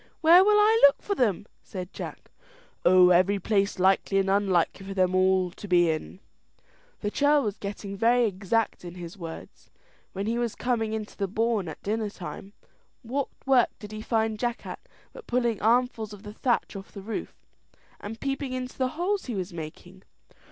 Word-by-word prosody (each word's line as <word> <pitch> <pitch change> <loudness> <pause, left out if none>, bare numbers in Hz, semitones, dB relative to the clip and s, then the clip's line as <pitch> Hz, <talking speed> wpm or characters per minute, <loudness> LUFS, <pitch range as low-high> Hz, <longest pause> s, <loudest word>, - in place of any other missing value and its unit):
"Where 345 +3 +8
will 420 +1 +4
I 435 +2 +4
look 280 +1 +7
for 405 - -1
them?" 215 - 0 0.2
said 185 -2 -8
Jack. - - -8 0.5
"Oh, 180 0 +6
every 185 +3 +4
place 200 +1 0
likely 190 +1 +2
and 195 0 +2
unlikely 195 -2 +1
for 195 - -5
them 185 -1 +2
all 185 -1 +3
to 205 - -10
be 175 -3 +4
in." 160 +4 -6 0.8
The 205 - -2
churl 290 +2 +3
was 210 -2 -3
getting 200 0 -6
very 235 +4 +3
exact 210 +2 -1
in 175 0 -8
his 175 -1 -8
words. 165 -4 -10 0.4
When 195 +1 -3
he 230 +2 -1
was 235 -2 -2
coming 225 -3 -1
into 215 -1 -5
the 200 - -2
bawn 220 -1 0
at 160 - -8
dinner 215 +1 -1
time, 195 +1 -9 0.5
what 265 +4 -2 0.2
work 265 -3 +4
did 210 -1 -10
he 215 0 -6
find 220 -1 0
Jack 240 0 -2
at - - -6 0.3
but - - -12
pulling 240 -3 0
armfuls 230 -1 +1
of 205 0 -12
the 210 -1 -9
thatch 240 -1 -1
off 195 0 -9
the 200 - -9
roof, 220 +2 -5 0.6
and 225 +2 -7
peeping 275 -1 -3
into 255 0 -5
the 260 - +2
holes 385 +3 -1
he 245 - -4
was 185 -1 -4
making? 170 +3 -9
210 Hz, 185 wpm, -27 LUFS, 190-240 Hz, 0.8 s, Where